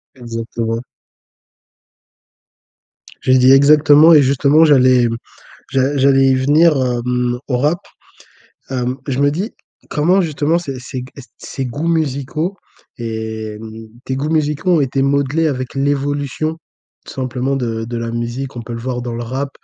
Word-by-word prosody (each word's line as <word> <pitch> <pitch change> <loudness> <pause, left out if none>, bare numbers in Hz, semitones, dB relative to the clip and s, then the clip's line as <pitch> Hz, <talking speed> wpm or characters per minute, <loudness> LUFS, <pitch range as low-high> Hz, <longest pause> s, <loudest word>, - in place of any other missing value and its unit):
Exactement. 115 -1 -4 2.4
Je - - +1
lui 130 - +6
ai - - +3
dit: 130 +1 +6
«Exactement!» 150 +3 +6
et 150 - +7
justement, 140 +3 +3
j'allais, 130 -4 +5
hem, 115 -1 0 0.5
j'a 135 +1 +1
j'allais 135 0 +4
y 130 - +4
venir, 150 +5 +4
hem, 125 -1 -1
au 125 - 0
Rap. 150 +7 +1 0.9
Hem, 125 -1 -2
je 135 -1 -2
me 145 0 +3
dis, 190 +10 -3 0.4
comment 180 +6 +2
justement 155 -1 0
ces 135 -7 -6
ces 130 +1 -6
g 125 - -7
heu, - - -8 0.2
ces 135 - -6
goûts 145 +7 -4
musicaux 155 +2 -1 0.4
et, 110 -2 -5
hem, 110 +1 -10 0.2
tes 130 - -2
goûts 140 +3 -2
musicaux 155 +2 0
ont - - +2
été 135 0 -1
modelés 140 +3 +1
avec 130 -3 -4
l'évolution 145 +2 -1 0.5
tout - - -10
simplement 130 +1 -2
de 115 -4 -3
de 120 +1 -5
la 115 0 -4
musique? 120 +3 -4
On 120 - -5
peut 120 - -7
le 115 - -5
voir 125 +1 -4
dans 120 -1 -5
le 120 - -4
Rap, 135 +4 -3
135 Hz, 160 wpm, -17 LUFS, 120-145 Hz, 2.4 s, et